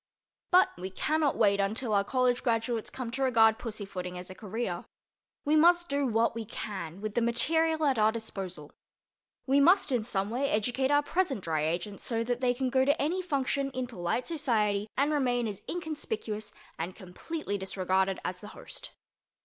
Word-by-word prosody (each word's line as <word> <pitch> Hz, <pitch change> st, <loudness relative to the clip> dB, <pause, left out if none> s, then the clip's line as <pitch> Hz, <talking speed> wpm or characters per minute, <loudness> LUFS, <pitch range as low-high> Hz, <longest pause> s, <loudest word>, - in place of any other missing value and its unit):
But 365 Hz, +1 st, +6 dB
we 185 Hz, +1 st, -4 dB
cannot 305 Hz, +8 st, 0 dB
wait 200 Hz, -3 st, +4 dB
until 215 Hz, +3 st, 0 dB
our 200 Hz, -1 st, +4 dB
college 250 Hz, +2 st, +1 dB
graduates 230 Hz, -1 st, 0 dB
come 250 Hz, -3 st, -5 dB
to 265 Hz, +3 st, -4 dB
regard 225 Hz, -4 st, +4 dB
pussyfooting 195 Hz, -5 st, -5 dB
as 180 Hz, +1 st, -7 dB
a -, -, -6 dB
career. 205 Hz, -2 st, -4 dB, 0.6 s
We 300 Hz, +2 st, +3 dB
must 345 Hz, +2 st, +5 dB
do 280 Hz, -1 st, +1 dB
what 230 Hz, 0 st, +2 dB
we 230 Hz, 0 st, -4 dB
can 195 Hz, -5 st, -6 dB
with 215 Hz, -1 st, -3 dB
the 235 Hz, -, +1 dB
material 315 Hz, +7 st, +2 dB
at 265 Hz, -5 st, +2 dB
our 215 Hz, +1 st, +5 dB
disposal. 195 Hz, -9 st, -6 dB, 0.7 s
We 275 Hz, +1 st, +4 dB
must 345 Hz, +2 st, +5 dB
in 245 Hz, -4 st, +1 dB
some 205 Hz, -2 st, -2 dB
way 270 Hz, +4 st, 0 dB
educate 245 Hz, +5 st, +1 dB
our 290 Hz, 0 st, +4 dB
present 290 Hz, -, 0 dB
Dry 155 Hz, -2 st, 0 dB
Agents 180 Hz, +5 st, -3 dB
so 230 Hz, -1 st, 0 dB
that 245 Hz, +1 st, -2 dB
they 245 Hz, -1 st, +2 dB
can 260 Hz, 0 st, -1 dB
go 260 Hz, +1 st, +4 dB
to 285 Hz, +2 st, +2 dB
any 340 Hz, +6 st, 0 dB
function 280 Hz, -4 st, -1 dB
in 255 Hz, 0 st, -1 dB
polite 210 Hz, 0 st, -2 dB
society 220 Hz, -10 st, +1 dB
and 280 Hz, +3 st, +2 dB
remain 250 Hz, -5 st, +1 dB
as 205 Hz, -1 st, -5 dB
inconspicuous 305 Hz, -, -4 dB, 0.3 s
and 170 Hz, +3 st, -3 dB
as -, -, -22 dB
completely 205 Hz, -, -5 dB
disregarded 190 Hz, 0 st, 0 dB
as 180 Hz, 0 st, -3 dB
the 210 Hz, -, -9 dB
host. -, -, -7 dB
230 Hz, 180 wpm, -29 LUFS, 200-280 Hz, 0.7 s, But